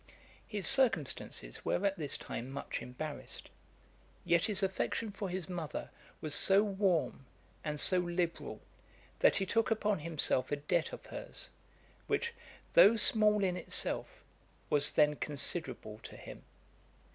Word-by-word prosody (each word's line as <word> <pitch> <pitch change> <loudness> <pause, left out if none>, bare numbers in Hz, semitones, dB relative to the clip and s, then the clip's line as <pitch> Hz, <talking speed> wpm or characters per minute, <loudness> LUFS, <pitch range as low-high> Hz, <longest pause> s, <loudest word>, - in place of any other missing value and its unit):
His 205 -3 -4
circumstances 175 - +2
were 200 - -1
at 195 -1 +1
this 150 -6 -1
time 120 +3 -6
much 135 +1 -5
embarrassed; 145 +4 -7 0.7
yet 170 -1 +3
his 205 -2 0
affection 195 +3 -2
for 200 -1 -5
his 180 -2 -4
mother 170 -4 -5 0.3
was 155 -2 -1
so 195 +1 +5
warm, 190 -9 -1 0.4
and 150 -1 -3
so 185 +4 +4
liberal, 175 -1 -3 0.6
that - - +5
he 195 - +1
took 225 +5 +1
upon 210 -3 0
himself 150 -5 +3
a - - +2
debt 150 +3 -1
of - - -10
her's, - - -5 0.6
which, 470 0 -1 0.4
though 215 +3 +7
small 210 -1 +4
in 185 -2 0
itself, 180 - 0 0.5
was 145 0 +4
then 150 -1 +3
considerable 145 -7 -2
to - - -11
him. - - -11
175 Hz, 135 wpm, -33 LUFS, 150-200 Hz, 0.7 s, though